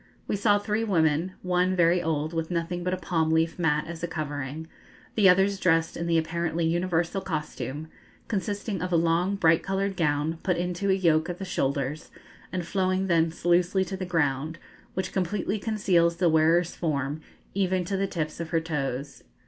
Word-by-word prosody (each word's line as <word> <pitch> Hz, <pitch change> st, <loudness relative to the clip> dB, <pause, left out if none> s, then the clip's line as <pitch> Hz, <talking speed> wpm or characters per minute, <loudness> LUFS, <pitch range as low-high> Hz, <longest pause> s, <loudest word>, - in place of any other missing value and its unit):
We -, -, 0 dB
saw 205 Hz, +1 st, +3 dB
three 210 Hz, +2 st, -1 dB
women, 165 Hz, -3 st, +1 dB
one 180 Hz, 0 st, +1 dB
very 175 Hz, 0 st, +4 dB
old, 155 Hz, -1 st, -1 dB
with 165 Hz, -1 st, -2 dB
nothing 175 Hz, 0 st, -2 dB
but 180 Hz, -, -1 dB
a -, -, -7 dB
palm 165 Hz, -3 st, 0 dB
leaf 160 Hz, +1 st, +1 dB
mat 150 Hz, -3 st, +1 dB
as 170 Hz, 0 st, -7 dB
a 170 Hz, -, -1 dB
covering, 150 Hz, -1 st, -4 dB, 0.5 s
the 205 Hz, -4 st, +5 dB
others 195 Hz, +2 st, +3 dB
dressed 165 Hz, -3 st, +2 dB
in 170 Hz, -, -3 dB
the 165 Hz, -1 st, +3 dB
apparently 165 Hz, 0 st, -1 dB
universal 175 Hz, +2 st, 0 dB
costume, 155 Hz, -3 st, -4 dB, 0.4 s
consisting 205 Hz, -2 st, -2 dB
of 180 Hz, 0 st, -3 dB
a -, -, +3 dB
long 170 Hz, +4 st, +2 dB
bright 165 Hz, -4 st, +4 dB
coloured 195 Hz, 0 st, -1 dB
gown, 155 Hz, -1 st, 0 dB
put 180 Hz, -2 st, 0 dB
into 180 Hz, +3 st, -1 dB
a -, -, +5 dB
yoke 165 Hz, -3 st, +2 dB
at 175 Hz, -, -4 dB
the 195 Hz, -, -5 dB
shoulders, 140 Hz, -3 st, -2 dB, 0.4 s
and 180 Hz, -2 st, -3 dB
flowing 185 Hz, +1 st, 0 dB
thence 165 Hz, -2 st, +1 dB
loosely 175 Hz, +2 st, +3 dB
to 190 Hz, -, -5 dB
the 190 Hz, -, -5 dB
ground, 155 Hz, -2 st, 0 dB, 0.4 s
which 185 Hz, 0 st, -3 dB
completely 195 Hz, +2 st, -1 dB
conceals 185 Hz, -6 st, +2 dB
the 175 Hz, 0 st, +2 dB
wearer's 165 Hz, +2 st, +3 dB
form, 145 Hz, -2 st, -2 dB, 0.3 s
even 185 Hz, -2 st, 0 dB
to 195 Hz, -, -2 dB
the 195 Hz, +1 st, 0 dB
tips 160 Hz, -4 st, -4 dB
of 170 Hz, -1 st, -4 dB
her 165 Hz, 0 st, +2 dB
toes. 140 Hz, -4 st, -4 dB
170 Hz, 180 wpm, -27 LUFS, 160-185 Hz, 0.5 s, the